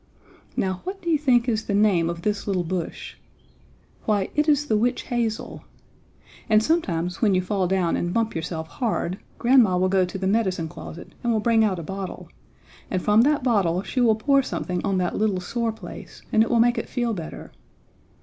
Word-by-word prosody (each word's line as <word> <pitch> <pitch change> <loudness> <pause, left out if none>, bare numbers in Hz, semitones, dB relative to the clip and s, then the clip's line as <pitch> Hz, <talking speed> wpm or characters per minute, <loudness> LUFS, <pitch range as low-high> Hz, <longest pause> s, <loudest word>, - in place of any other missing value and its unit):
Now, 185 -1 -1
what 385 +1 -5
do 340 - 0
you 310 - +3
think 250 -4 +3
is 225 -2 0
the 200 - -1
name 195 -5 +3
of 170 0 -5
this 210 -1 -1
little 190 -3 0
bush? 175 0 -5 0.9
Why, 205 -3 +1
it 300 +2 +2
is 295 -1 +3
the 220 - +1
witch 240 +4 +1
hazel. 235 -3 -3 0.9
And 215 0 +5
sometime 180 - 0
when 205 -5 +3
you 185 - +2
fall 190 -1 0
down 185 -2 +1
and 175 - -1
bump 225 +2 0
yourself 160 0 -4
hard 200 -3 -2 0.2
grandma 235 -7 +4
will 185 +1 +2
go 190 -1 +3
to 180 +1 -4
the 190 - -3
medicine 190 -5 +1
closet 160 +2 -10
and 240 - +1
will 220 - +2
bring 225 0 +3
out 200 -4 +1
a 170 - -5
bottle, 195 +3 -6 0.6
and 185 - 0
from 210 +4 +4
that 285 +1 +2
bottle 195 -7 +2
she 255 - -2
will 225 -3 +4
pour 275 +5 +3
something 180 -8 -3
on 195 -2 0
that 180 -1 -1
little 210 -3 +1
sore 230 +5 -2
place 215 -5 -11
and 220 - +5
it 225 - +2
will 235 - +3
make 240 0 +3
it - - -6
feel 240 -2 -1
better. 165 -5 -7
210 Hz, 200 wpm, -24 LUFS, 185-235 Hz, 0.9 s, And